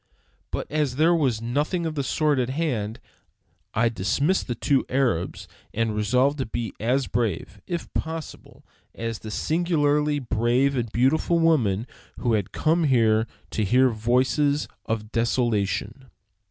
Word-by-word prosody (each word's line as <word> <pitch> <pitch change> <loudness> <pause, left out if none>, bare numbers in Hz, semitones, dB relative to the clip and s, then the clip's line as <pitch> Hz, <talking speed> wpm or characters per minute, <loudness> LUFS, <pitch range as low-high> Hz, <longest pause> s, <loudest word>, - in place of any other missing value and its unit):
But - - -3
as 150 -4 0
there 160 +5 +4
was 130 -9 +1
nothing 150 +8 -1
of 160 - -2
the 145 - -1
sort 145 +1 +1
at 125 0 0
hand, 125 -8 -2 0.8
I 115 +2 +3
dismissed 115 - 0
the 120 - -2
two 135 +2 +2
Arabs 125 -10 0 0.3
and 115 -1 0
resolved 125 +7 +2
to 130 - -2
be 115 -2 -4
as 125 +5 +1
brave, 105 -4 -2
if 170 -2 -3
possible, 160 0 -6 0.3
as 115 -1 -4
the 110 - -8
singularly 150 - +1
brave 125 +2 +1
and 120 -4 -2
beautiful 135 +8 +2
woman 125 -11 +2 0.3
who 120 -3 0
had 105 -2 0
come 160 +1 +1
here 115 -4 +3 0.2
to 110 - -1
hear 125 +6 +4
the - - -4
voices 130 +6 +1 0.2
of 110 -1 -3
desolation. 115 +1 -1
125 Hz, 145 wpm, -25 LUFS, 115-150 Hz, 0.8 s, there